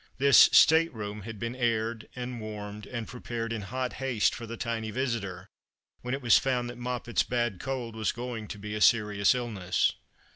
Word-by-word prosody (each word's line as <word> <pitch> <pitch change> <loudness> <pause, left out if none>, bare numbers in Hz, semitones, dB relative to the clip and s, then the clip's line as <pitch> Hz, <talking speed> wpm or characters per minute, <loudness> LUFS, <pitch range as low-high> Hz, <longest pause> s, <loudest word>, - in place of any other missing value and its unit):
This 140 -2 +7
state 165 +1 +6
room 105 -1 -5
had 110 +2 -8
been 115 +4 -4
aired 115 -2 -1
and 125 -2 -5
warmed 105 -1 -7
and 115 -3 -5
prepared 115 -2 -5
in 110 - -3
hot 125 +5 -3
haste 125 -5 +2
for 115 - -7
the 115 +1 -6
tiny 115 -2 -3
visitor, 115 -6 -3 0.5
when 125 +2 -2
it 135 - -8
was 120 -3 +6
found 125 -2 -1
that 120 - -12
Moppet's 120 -1 -1
bad 120 -6 -1
cold 125 -3 -4
was 110 -1 0
going 120 -3 -6
to 105 - -7
be 105 +1 -6
a 105 - -3
serious 105 -2 +4
illness. 105 -7 0
115 Hz, 185 wpm, -28 LUFS, 105-125 Hz, 0.5 s, This